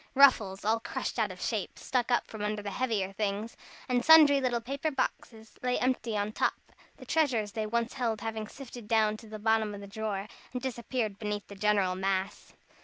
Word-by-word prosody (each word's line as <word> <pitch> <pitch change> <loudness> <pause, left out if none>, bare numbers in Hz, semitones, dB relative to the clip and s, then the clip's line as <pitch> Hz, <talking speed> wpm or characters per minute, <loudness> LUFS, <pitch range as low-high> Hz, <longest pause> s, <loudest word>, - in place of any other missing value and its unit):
Ruffles, 220 -9 +5
all 225 +1 +3
crushed - - -4
out - - +2
of - - -9
shape, - - -2
stuck 250 -2 -1
up 245 - +2
from 220 - -9
under 210 0 -2
the 205 - -4
heavier 210 -5 -1
things, 210 +2 -2 0.3
and 245 -1 +1
sundry 300 -3 +8
little 245 -2 +1
paper 275 +6 -2
boxes 225 -5 -4
lay 250 0 +1
empty 245 -4 0
on 205 +1 -1
top, - - +1 0.4
the - - -12
treasures 250 -10 +1
they 215 +1 -2
once 235 +2 -1
held 225 -4 -1
having 220 -1 -4
sifted 245 -3 -10
down 215 -1 +3
to 225 - -13
the 215 0 -7
bottom 220 -1 +1
of 200 - -9
the - - -8
drawer, 200 -1 -4 0.3
and 250 - -2
disappeared 235 -4 -2
beneath 210 -1 -3
the 200 - -9
general 200 -2 +2
mass. 190 +1 -2
220 Hz, 195 wpm, -30 LUFS, 210-250 Hz, 0.4 s, sundry